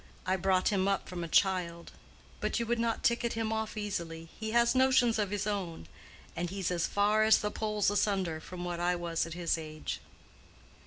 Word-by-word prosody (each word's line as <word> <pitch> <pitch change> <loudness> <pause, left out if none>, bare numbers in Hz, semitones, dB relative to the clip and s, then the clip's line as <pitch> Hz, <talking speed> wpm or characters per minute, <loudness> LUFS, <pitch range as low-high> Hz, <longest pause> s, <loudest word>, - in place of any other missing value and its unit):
I 185 - +2
brought 190 0 +2
him 195 -2 +1
up 200 -1 0
from 175 -1 -5
a - - -3
child; 170 -1 +1 0.5
but - - -1
you 235 - -1
would 235 +1 0
not 230 -1 0
ticket 235 0 +2
him 225 -1 -1
off 220 -1 -3
easily, 165 -6 -4
he 220 0 -3
has 235 +1 +4
notions 255 -3 +4
of 205 -2 0
his 205 0 -2
own, 190 - -3 0.5
and 175 0 -2
he's 190 -1 -2
as 170 -2 0
far 205 +1 +2
as 220 0 +6
the 210 - -2
poles 210 -2 0
asunder 190 -6 0
from 180 +2 -7
what 175 -1 -3
I 175 +1 +1
was 170 -1 -1
at 165 - -7
his 170 -1 0
age." 155 -1 -5
195 Hz, 200 wpm, -31 LUFS, 175-220 Hz, 0.5 s, as